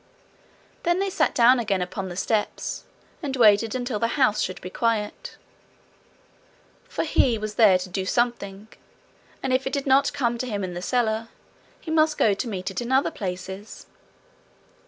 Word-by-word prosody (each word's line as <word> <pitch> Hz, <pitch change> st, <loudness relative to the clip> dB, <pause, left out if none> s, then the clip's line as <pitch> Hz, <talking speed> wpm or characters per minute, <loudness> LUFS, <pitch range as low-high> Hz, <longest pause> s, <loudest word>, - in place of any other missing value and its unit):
Then 345 Hz, +1 st, +1 dB
they 390 Hz, 0 st, -1 dB
sat -, -, +1 dB
down 245 Hz, +1 st, +6 dB
again 200 Hz, -5 st, 0 dB
upon 190 Hz, +1 st, -5 dB
the 175 Hz, -, -7 dB
steps, 210 Hz, +3 st, -2 dB, 0.4 s
and 280 Hz, -4 st, -3 dB
waited 220 Hz, -1 st, +4 dB
until 245 Hz, -4 st, -2 dB
the 230 Hz, -, +1 dB
house 255 Hz, -7 st, +3 dB
should 185 Hz, -, -3 dB
be 185 Hz, -, -8 dB
quiet. 225 Hz, -2 st, -2 dB, 1.5 s
For -, -, -3 dB
he 255 Hz, -6 st, +2 dB
was 215 Hz, 0 st, -5 dB
there 210 Hz, -4 st, +6 dB
to 185 Hz, +1 st, -6 dB
do 190 Hz, +1 st, -3 dB
something, 215 Hz, -4 st, -1 dB, 0.8 s
and 260 Hz, -, 0 dB
if 260 Hz, +1 st, +1 dB
it 265 Hz, -, -4 dB
did 280 Hz, -1 st, -1 dB
not 270 Hz, 0 st, +4 dB
come 240 Hz, -4 st, -1 dB
to 255 Hz, -, -2 dB
him 205 Hz, -3 st, -2 dB
in 180 Hz, -1 st, -4 dB
the 175 Hz, -, -5 dB
cellar, 225 Hz, 0 st, 0 dB, 0.5 s
he 320 Hz, -, -7 dB
must 315 Hz, -1 st, +3 dB
go 210 Hz, -, +4 dB
to 205 Hz, +6 st, -3 dB
meet 195 Hz, -3 st, -4 dB
it 190 Hz, -, -4 dB
in 240 Hz, +1 st, -4 dB
other 265 Hz, +1 st, +3 dB
places. 190 Hz, +2 st, -6 dB
225 Hz, 175 wpm, -24 LUFS, 195-260 Hz, 1.5 s, down